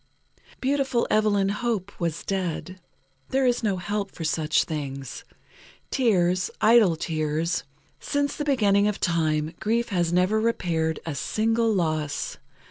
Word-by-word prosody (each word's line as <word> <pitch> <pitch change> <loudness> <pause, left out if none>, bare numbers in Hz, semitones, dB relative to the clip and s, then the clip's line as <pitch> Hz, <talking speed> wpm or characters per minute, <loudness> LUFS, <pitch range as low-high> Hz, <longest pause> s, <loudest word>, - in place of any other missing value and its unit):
Beautiful 270 -2 +1
Evelyn 205 -2 +3
Hope 210 -2 -2
was 165 -2 -2
dead. 185 -1 -3 0.5
There 265 0 +2
is 245 -1 +2
no 205 -4 0
help 200 +2 -3
for 165 - -7
such 155 0 +1
things. 140 -4 -5 0.7
Tears, 185 -8 +2
idle 220 -6 +5
tears. 160 +1 -1 0.4
Since 285 0 -1
the 295 - -3
beginning 210 -8 +3
of 210 - -2
time, 155 -2 0
grief 235 +2 0
has 175 -4 0
never 185 +5 +2
repaired 165 -8 0
a 165 - -3
single 225 - +1
loss. 155 -6 -1
190 Hz, 125 wpm, -25 LUFS, 165-225 Hz, 0.7 s, idle